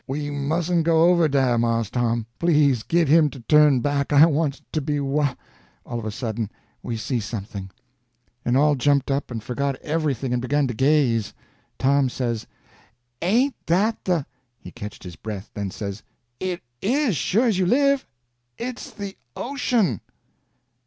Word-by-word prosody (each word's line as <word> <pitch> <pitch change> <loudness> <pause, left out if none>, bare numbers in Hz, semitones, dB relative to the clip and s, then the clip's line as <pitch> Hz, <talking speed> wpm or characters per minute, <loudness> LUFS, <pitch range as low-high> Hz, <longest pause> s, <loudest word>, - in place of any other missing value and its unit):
We 145 +2 -3
mustn't 165 +4 0
go 165 +1 +5
over 170 -2 +4
dah, 130 -4 +2
Mars 115 -2 0
Tom. 120 -2 0
Please 150 -7 +3
git 170 +6 +1
him 155 +1 +5
to 135 - -11
turn 150 0 +5
back; 145 +1 0
I 145 +2 +8
wants 150 -3 0
to 155 - -1
be 145 0 -1
whah—" 140 -1 0 0.5
All 120 -1 -4
of 110 - -7
a - - -2
sudden 110 -1 -3 0.3
we 115 - -4
see 120 +2 -2
something, 100 -2 -6 0.7
and 120 +2 +2
all 150 +1 +4
jumped 140 +1 +2
up, 135 +1 -1
and 115 -3 -5
forgot 140 +3 -2
everything 145 -5 -1
and 125 - 0
begun 145 +3 +1
to 125 - -2
gaze. 130 -4 +2 0.4
Tom 135 0 +3
says: 120 -3 -3 0.7
"Ain't 240 +10 +2
that 210 +7 +1
the—" 175 -6 +1 0.3
He - - -11
catched 105 +1 -9
his 90 -4 -9
breath, 105 +2 -7
then 100 -2 -3
says: 100 +1 -6 0.4
"It 185 -2 -3 0.2
is, 250 - +1
sure 215 - +2
as 215 -6 +2
you 185 - +2
live! 275 +4 +3 0.5
It's 250 +2 -5
the 205 -5 -7 0.2
ocean!" 235 - 0
140 Hz, 160 wpm, -23 LUFS, 120-170 Hz, 0.7 s, I